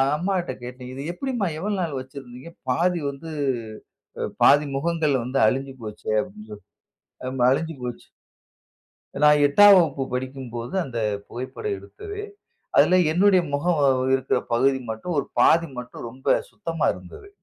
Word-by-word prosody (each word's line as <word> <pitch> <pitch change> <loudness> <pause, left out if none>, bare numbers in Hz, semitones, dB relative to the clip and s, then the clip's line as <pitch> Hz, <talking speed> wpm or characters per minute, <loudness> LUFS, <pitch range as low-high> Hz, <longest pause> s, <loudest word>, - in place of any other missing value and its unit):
அம்மா 185 +5 -1
கிட்ட 165 -7 -4
கேட்டேன், 125 +1 -8
"இது 135 - -6
எப்டிம்மா 245 -3 -2
எவ்வளவு 200 +1 -2
நாள் 155 -6 -2
வச்சிருந்தீங்க? 130 +1 -10 0.2
பாதி 175 +5 +1
வந்து, 145 +4 -10 0.9
ப - - -2 0.2
பாதி 145 +2 +6
முகங்கள் 155 -1 +1
வந்து 130 +3 -1
அழுஞ்சு 135 +3 -1
போச்சே" 105 0 -7
அப்டினு - - -8 0.8
சொல்லி, 130 - -9
அம்மா 125 -2 +2
அழுஞ்சு 160 +3 -1
போச்சு. 120 -1 -6 1.2
நான் 150 0 +6
8ஆம் 205 +8 +8
வகுப்பு 150 -6 +2
படிக்கும்போது 130 0 -5
அந்த 120 -3 -5 0.3
புகைப்படம் 265 - -4
எடுத்தது. 415 0 -8 0.6
அதில 185 - +6 0.2
என்னுடைய 190 +2 +5
முகம் 155 +2 +1 0.3
இருக்ற 135 - +1
பகுதி 130 +3 +3
மட்டும், 110 +11 -4
ஒரு - - 0
பாதி 165 -1 +5
மட்டும் 125 -1 -7
ரொம்ப 130 +3 -17 0.2
சுத்தமா 165 -6 -2
இருந்தது. 90 - -12
140 Hz, 140 wpm, -24 LUFS, 130-175 Hz, 1.2 s, 8ஆம்